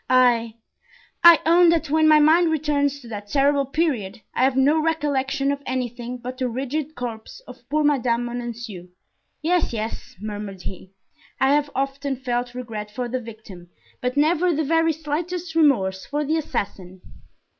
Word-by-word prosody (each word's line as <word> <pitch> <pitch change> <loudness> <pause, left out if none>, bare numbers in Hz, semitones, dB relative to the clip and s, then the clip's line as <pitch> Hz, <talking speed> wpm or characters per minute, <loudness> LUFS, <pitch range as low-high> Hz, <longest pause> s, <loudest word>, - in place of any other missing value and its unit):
"I—I 245 +6 +3
own 340 +1 +6
that 325 -3 +1
when 315 0 +4
my 310 0 +7
mind 320 +3 +5
returns 285 -2 0
to 240 - -13
that 205 -2 -7
terrible 280 +1 +2
period 270 - -1
I - - +1
have 265 0 +3
no 290 +4 +4
recollection 280 -4 0
of 280 0 -3
anything 250 -1 -4
but 250 +2 -8
the 255 -1 0
rigid 275 +5 -3
corpse 235 - -7
of 250 - -15
poor 305 +1 +1
Madame 245 -5 +1
Bonancieux. 235 -6 -6 0.6
Yes, 345 -4 +1
yes," 220 0 -5
murmured 205 -2 -6
he, 185 0 -8 0.5
"I 265 +1 +4
have 290 0 +1
often 275 +1 -2
felt 245 -1 -3
regret 220 -4 -6
for 245 +4 -4
the 255 +1 -3
victim, 215 -6 -12 0.3
but 250 +2 -2
never 335 +4 +3
the 315 -1 0
very 325 +2 +3
slightest 320 +3 -4
remorse 205 -13 +2
for 295 +1 -2
the 315 +3 +1
assassin." 190 - -4
265 Hz, 155 wpm, -23 LUFS, 235-305 Hz, 0.6 s, my